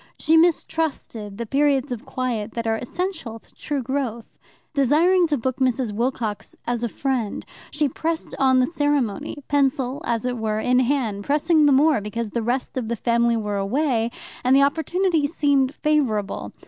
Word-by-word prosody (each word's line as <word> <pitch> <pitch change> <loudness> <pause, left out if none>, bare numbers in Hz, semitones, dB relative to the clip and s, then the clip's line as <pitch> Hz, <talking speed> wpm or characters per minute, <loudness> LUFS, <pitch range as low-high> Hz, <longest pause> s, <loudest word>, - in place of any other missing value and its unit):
She 320 - +2
mistrusted 315 - 0
the 235 - -4
periods 275 +1 +1
of 240 -3 -5
quiet 235 -4 -3
that 230 -1 -3
are 225 0 +1
essential 320 - -4
to - - -22
true 285 -3 -3
growth. 245 -3 -3 0.5
Desiring 330 +6 +4
to 295 -2 0
book 255 +1 -2
Mrs. 255 -3 0
Wilcox 230 -2 -2
as 240 -1 -2
a 235 - 0
friend, 255 -4 -2 0.2
she 295 -1 0
pressed 320 +4 -3
on 260 -1 +4
the 255 - +4
ceremony, 290 - -1
pencil, 270 -2 +1
as 230 0 -1
it 250 -1 -2
were, 215 -1 -1
in 250 +3 +2
hand, 245 -6 0
pressing 300 +3 +3
the - - +5
more 280 -2 +4
because 210 +1 -4
the 235 - -1
rest 250 +4 -2
of 245 -4 -2
the 235 - -1
family 235 +1 +2
were 210 -2 -2
away, 230 +3 0 0.3
and 255 +1 +4
the 275 - +6
opportunity 320 +2 +1
seemed 285 -4 +1
favourable. 255 -10 0
260 Hz, 170 wpm, -23 LUFS, 230-290 Hz, 0.5 s, the